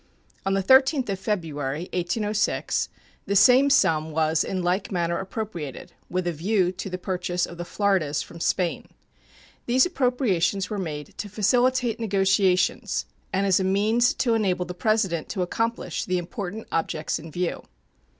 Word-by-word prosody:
On 195 - +2
the 195 - 0
13th 265 - +4
of 195 -1 -2
February, 160 -6 -3
1806, 205 +4 0 0.4
the 200 - 0
same 250 +7 +6
sum 160 - +3
was 160 0 +1
in 185 -2 -3
like 180 +3 0
manner 170 -2 0
appropriated, 190 - -6 0.2
with 185 0 -1
a 175 - 0
view 180 +3 +1
to 190 +1 -6
the 185 - -4
purchase 180 -1 -2
of 175 - -11
the 175 - -4
Floridas 185 -6 0
from 170 - -12
Spain. 175 +1 -1 0.8
These 255 +2 +4
appropriations 235 - 0
were 210 - -2
made 150 -5 -5
to 205 - -4
facilitate 240 +3 +2
negotiations 195 -3 +1 0.3
and 195 +1 +1
as 190 -1 +3
a - - 0
means 215 +5 +2
to 235 -3 +1
enable 185 -5 +1
the 180 - -6
President 190 -5 0
to 185 - -1
accomplish 225 -2 -2
the 185 - 0
important 200 +3 -5
objects 160 -1 -1
in 160 +1 -10
view. 175 +2 -2
190 Hz, 155 wpm, -25 LUFS, 175-215 Hz, 0.8 s, same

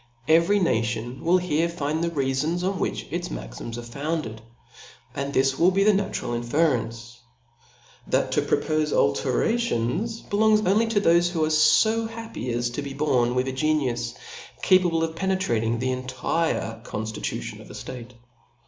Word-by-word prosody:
Every 170 +6 +4
nation 115 - -1
wilj 180 +2 +3
here 170 -1 +1
find 160 -1 -2
the 170 - +1
reafons! 150 +3 -1
pn 190 +1 -1
which, - - -2
its - - -3
maxiqis - - -7
are 120 - -6
founded 140 -1 -4
j 110 - -16 0.7
and 140 0 -3
this 135 0 +1
will 175 - +6
be 195 +1 +2
the 210 +1 +5
natural 190 -11 -2
in 120 - -1
ference, 120 -4 -1 0.9
that - - +1
to - - +2
propofe. 155 -1 0
alterations, 220 - 0
belongs 215 +1 +3
only 215 +4 +2
tOf 210 -3 +1
thofe 170 0 +4
who 170 -2 -2
^fofo. 155 +9 +3
happy 225 - -7
j^S'to 120 +4 -2
be 140 -1 -6
born 130 -4 +1
with 125 +1 +1
a - - -1
genius 130 - 0 0.5
capaSle 175 -3 +4
of 160 0 -2
penetrating 170 - 0
intp - - -4
the 130 0 0
entire 130 -2 -2
conftitution 110 -2 -5
of - - -14
a - - -10
ftate. 125 -1 -8
150 Hz, 155 wpm, -25 LUFS, 120-180 Hz, 0.9 s, will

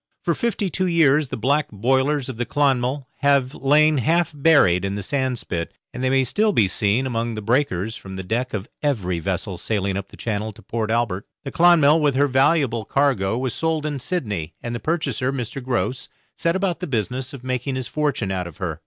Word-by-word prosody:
For - - +1
fifty 235 -4 -1
two 185 +1 -1
years 155 -4 +3
the - - -5
black 140 +6 +1
boilers 130 +6 +1
of 130 -4 -6
the 120 - 0
'Clonmel' 135 -1 +1
have 140 -2 +2
lain 150 +1 +3
half 165 +5 +1
buried 140 - +4
in 100 0 -2
the 100 - -4
sandspit, 125 -9 -2 0.3
and 125 - -5
they 130 - +2
may 135 0 +3
still 210 - +1
be 105 - +4
seen 105 +6 +1
among 115 -2 -2
the 110 - -4
breakers 110 -3 0
from 95 -4 -9
the 95 - -5
deck 120 +7 -2
of 100 -1 -4
every 100 - 0
vessel 95 +1 -3
sailing 100 -2 -1
up 100 0 -4
the - - -15
channel 110 -1 -3
to 110 +1 -17
Port 110 -2 -3
Albert. 110 -4 -1 0.2
The 135 - -5
'Clonmel', 165 -3 +5
with 145 -3 +2
her 140 +2 +4
valuable 135 -3 +2
cargo, 120 -7 +1
was 130 -2 -2
sold 160 -2 -1
in 145 -2 -2
Sydney, 105 - -3
and 120 - -5
the 120 - -3
purchaser, 135 -5 -1
Mr. 130 0 -5
Grose, 125 0 -2 0.3
set 170 +1 0
about 190 -2 0
the 180 - -4
business 125 +1 -2
of 135 -3 -10
making 130 +1 -2
his 130 -1 -3
fortune 145 -10 -1
out 90 -2 -2
of 85 - -12
her. - - -4
130 Hz, 205 wpm, -22 LUFS, 110-145 Hz, 0.3 s, Clonmel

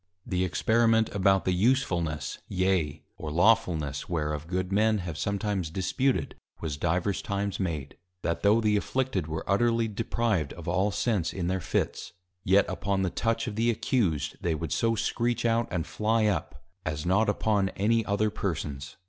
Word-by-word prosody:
_ - - -51 0.2
The 90 0 0
Experiment 110 +4 +2
about 95 -1 +3
the 95 - +2
Usefulness, 90 - 0
yea, 90 -5 0
or 75 - -5
Lawfulness 85 -6 +2
whereof 75 -2 -2
Good 90 +1 -2
Men 110 +2 +3
have 90 -5 -5
sometimes 100 -1 -1
disputed, 100 +10 0 0.3
was 80 -3 -3
divers 85 +5 0
Times 100 -1 -2
made, 80 -7 -3 0.3
That 85 -1 -1
tho' 105 +3 +4
the 105 -1 +3
Afflicted 120 -6 -1
were 80 0 -4
utterly 115 +3 +2
deprived 110 - -1
of - - -10
all 95 +3 +2
sense 100 -1 0
in 90 - -3
their 95 +1 -1
Fits, - - -2 0.3
yet 95 +2 +4
upon 100 -1 -1
the 90 - 0
Touch 115 0 0
of 115 -4 -4
the 115 +2 +2
Accused, 95 - 0
they 85 -2 0
would 80 -1 -4
so 115 +9 +2
screech 120 +1 0
out, 115 0 +2
and 85 -4 -2
fly 110 +1 +1
up, 85 -9 -2 0.2
as 75 -1 -3
not 95 +5 +3
upon 105 -2 +1
any 115 +3 +2
other 105 +1 0
persons. 75 -8 -4
95 Hz, 165 wpm, -28 LUFS, 85-110 Hz, 0.3 s, tho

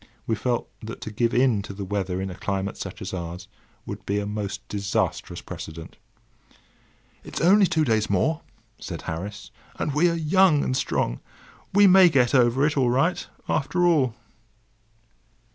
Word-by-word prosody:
We 115 - 0
felt 120 +2 -1
that 110 +1 -7
to 110 - -6
give 115 +2 +1
in 125 -5 +3
to 100 - -8
the 100 0 -5
weather 95 -2 -2
in 95 0 -3
a - - -8
climate 100 +1 -3
such 95 -1 -7
as 95 - -6
ours 90 0 -6 0.4
would - - -7
be 100 - -1
a 105 - -1
most 105 -1 -5
disastrous 100 -1 -2
precedent. 80 0 -9 1.3
"It's - - -6
only 195 +3 +5
two 160 -3 +1
days 110 -4 +1
more," 150 - +1 0.4
said 85 - -7
Harris, 95 +4 -6 0.2
"and 145 - -2
we 165 +5 +4
are 170 - -1
young 165 -1 +3
and 130 - -1
strong. - - -1 0.5
We 205 +1 +6
may 190 -1 +8
get 125 -6 +2
over 125 +1 +4
it 150 - +1
all 130 -3 +3
right, 145 +9 +1 0.2
after 165 +4 +1
all." 140 -9 +3
115 Hz, 165 wpm, -24 LUFS, 100-150 Hz, 1.3 s, may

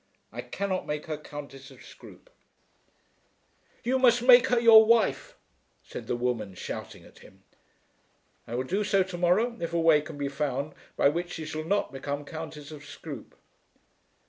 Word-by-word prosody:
I - - -5
cannot 195 -2 -3
make 150 0 -3
her 160 -2 -3
Countess 145 -2 -10
of 135 - -16
Scroope." - - -15 1.5
"You 260 +2 +1
must 245 -2 +4
make 250 0 +7
her 245 -2 +2
your 225 -2 +9
wife," 225 -1 +2 0.5
said - - -9
the - - -1
woman, 120 -5 -2
shouting - - -7
at - - -18
him. - - -18 1.0
"I 120 - -5
will 125 - -1
do 195 +10 -1
so 195 -2 +2
to 185 -1 -7
morrow 200 +8 +2
if 170 0 -3
a 170 - +1
way 165 -2 +5
can 155 0 -9
be 140 -1 -2
found 140 0 -3 0.2
by - - +5
which 175 +3 -3
she 160 - -6
shall 155 0 -5
not 200 -3 0
become 145 +2 -4
Countess 155 -1 -8
of 150 -2 -10
Scroope." 145 -3 -10
160 Hz, 170 wpm, -27 LUFS, 145-200 Hz, 1.5 s, your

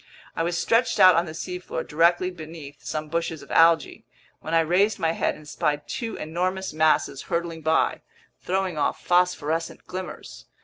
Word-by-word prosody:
I - - -1
was 170 +1 -1
stretched 230 +8 +2
out 185 0 +9
on 170 +1 +1
the 155 - -7
seafloor 180 -1 -5
directly 175 +4 +2
beneath 155 -4 -10
some 155 0 -4
bushes 165 -1 -3
of - - -13
algae, 165 -1 +4 0.4
when 160 - -3
I 165 - +5
raised 190 +6 +2
my 165 -3 +1
head - - -1
and 150 - -14
spied 145 0 -1
two 230 -1 -4
enormous 185 +4 -3
masses 155 -3 +2
hurtling 170 -2 -2
by, 160 +1 +1 0.4
throwing 185 -3 -2
off - - -1
phosphorescent 170 -3 0
glimmers. 185 0 -8
165 Hz, 165 wpm, -25 LUFS, 155-180 Hz, 0.4 s, out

